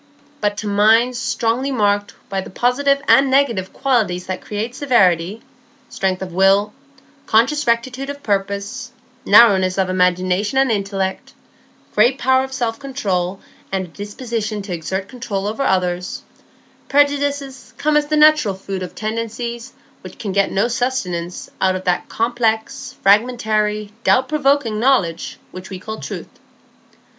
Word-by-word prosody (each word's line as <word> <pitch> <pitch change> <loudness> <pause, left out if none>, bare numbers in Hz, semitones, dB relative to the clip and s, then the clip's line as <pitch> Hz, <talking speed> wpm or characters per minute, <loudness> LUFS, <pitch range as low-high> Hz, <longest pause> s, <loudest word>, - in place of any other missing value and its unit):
But 205 -1 -1
to 215 - -5
minds 225 +5 +3
strongly 245 +2 -1
marked 205 -5 0
by 195 -1 -2
the - - -9
positive 275 +6 +1
and 270 0 +5
negative 245 -9 +1
qualities 220 -10 0
that 185 -1 -4
create 215 +3 -4
severity,—strength 215 - -1
of 180 -2 -8
will, 195 +3 +3 0.5
conscious 270 +7 +2
rectitude 255 +4 0
of 285 0 -7
purpose, 200 +4 -2 0.4
narrowness 200 -4 +6
of 190 -1 +1
imagination 185 +5 +1
and 270 -2 +3
intellect, 195 -2 -3 0.6
great 240 +5 +3
power 260 0 +3
of 265 - -7
self 235 -4 -2
control, 200 -10 -2 0.3
and 190 -1 -1
a - - -15
disposition 215 +2 -4
to 195 -2 -5
exert 190 +4 -4
control 215 -6 -4
over 215 +6 -3
others,—prejudices 275 +8 -2
come 305 +1 +1
as 300 0 +2
the 305 0 +1
natural 300 -9 +5
food 190 0 -6
of 180 - -7
tendencies 230 +2 -4 0.3
which - - -11
can 205 -4 -4
get 200 0 +1
no 200 +4 +1
sustenance 190 -9 -3
out 185 0 +2
of 185 - -5
that 180 -1 -1
complex, 225 -1 -1
fragmentary, 215 -1 +2
doubt 260 0 +3
provoking 280 -7 +1
knowledge 220 -10 +1
which 185 0 -9
we 190 - -6
call 220 +4 -7
truth. - - -8
220 Hz, 135 wpm, -19 LUFS, 195-260 Hz, 0.6 s, narrowness